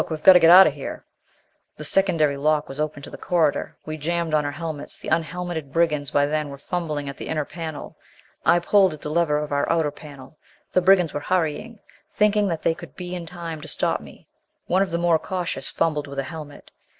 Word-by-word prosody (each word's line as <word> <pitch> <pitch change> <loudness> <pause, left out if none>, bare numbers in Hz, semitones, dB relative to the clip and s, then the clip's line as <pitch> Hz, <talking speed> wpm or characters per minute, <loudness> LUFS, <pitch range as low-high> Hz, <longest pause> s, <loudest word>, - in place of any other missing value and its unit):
We've 155 -1 -5
got 190 - +10
to 180 - +7
get 165 - +6
out 185 +2 +10
of 155 - +1
here!" 140 -2 -7 0.7
The 150 - -7
secondary 165 -4 +2
lock 150 +1 +1
was 135 +2 -7
open 150 -1 -3
to - - -9
the - - -10
corridor. 165 -5 0
We 155 0 -5
jammed 170 +1 -2
on 150 -1 +2
our 145 - -2
helmets. 155 -1 -6
The - - -7
unhelmeted 165 -2 -2
brigands 150 -3 +1
by 145 0 +2
then 150 0 -2
were 140 - -8
fumbling 150 -1 -3
at 140 - -6
the - - -7
inner 155 -2 -1
panel. 160 -3 -7 0.5
I - - +5
pulled 190 0 +3
at 150 - -17
the 150 - -4
lever 160 -2 +2
of 150 0 -3
the 145 +2 +1
outer 160 -3 +1
panel. 145 0 -13 0.3
The 185 - +3
brigands 180 -3 +4
were 145 - -2
hurrying, 180 +7 -2 0.3
thinking 210 -1 +2
that 165 -4 -3
they 165 - +2
could - - -12
be 180 -1 -7
in 175 -2 -6
time 165 -2 -6
to 155 - -9
stop - - -1
me. - - -15 0.4
One 185 +2 +2
of 195 - +1
the 170 - -1
more 170 -2 +2
cautious 180 +1 -3
fumbled 150 -3 -1
with 140 0 -9
a 135 - 0
helmet. 145 +1 -10
160 Hz, 220 wpm, -23 LUFS, 150-175 Hz, 0.7 s, got